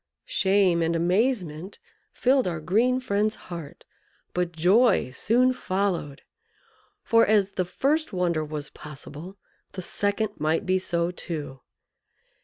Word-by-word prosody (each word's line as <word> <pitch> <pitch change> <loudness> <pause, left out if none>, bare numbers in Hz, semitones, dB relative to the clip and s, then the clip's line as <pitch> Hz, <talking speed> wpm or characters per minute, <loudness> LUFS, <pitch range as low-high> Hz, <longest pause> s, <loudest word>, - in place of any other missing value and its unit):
Shame 190 -3 +2
and 165 +1 +1
amazement 180 - 0 0.3
filled 260 -3 +2
our 170 -3 -2
green 230 +10 +2
friend's 215 -3 0
heart, 170 -5 -9 0.5
but 180 -1 -1
joy 185 - +3
soon 245 - +2
followed; 185 - -2 0.8
for, 230 -1 +4
as 205 -2 +3
the 185 - -1
first 295 - 0
wonder 175 -4 0
was 150 -1 -6
possible, 150 +5 -10 0.4
the 185 - -5
second 205 +3 -1
might 160 +6 0
be 185 0 +2
so 170 -1 -1
too. 150 -7 -6
185 Hz, 120 wpm, -25 LUFS, 165-215 Hz, 0.8 s, for